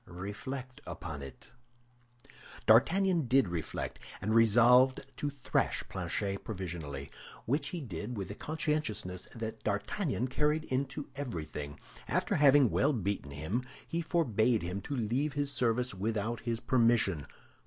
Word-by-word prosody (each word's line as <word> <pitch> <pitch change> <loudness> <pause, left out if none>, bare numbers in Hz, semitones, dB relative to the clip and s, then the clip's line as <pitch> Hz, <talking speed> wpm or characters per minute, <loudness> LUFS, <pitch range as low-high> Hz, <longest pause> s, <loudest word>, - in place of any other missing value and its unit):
Reflect 125 +8 -6
upon 75 -3 -6
it." 70 -2 -11 1.1
D'Artagnan 165 - +5
did 130 -2 +4
reflect, 85 -3 -4 0.2
and 110 +3 -1
resolved 120 +4 +6
to 145 - -1
thrash 140 -2 0
Planchet 95 +2 -2
provisionally; 85 -9 -5 0.3
which 140 +5 0
he 175 0 -4
did 110 - -5
with 95 -3 -3
the 105 - -6
conscientiousness 150 - -2
that 110 -1 -5
D'Artagnan 125 - -1
carried 150 +4 +1
into 135 +2 -2
everything. 80 - -5 0.3
After - - +1
having 140 -4 +6
well 145 +3 +3
beaten 100 - -2
him, 80 - -2 0.3
he 170 - -1
forbade 125 - +2
him 90 +3 -3
to 140 +8 -4
leave 130 +5 0
his 145 0 0
service 125 0 +1
without 110 +3 -1
his 115 -1 -2
permission. 115 - +3
115 Hz, 130 wpm, -32 LUFS, 95-140 Hz, 1.1 s, resolved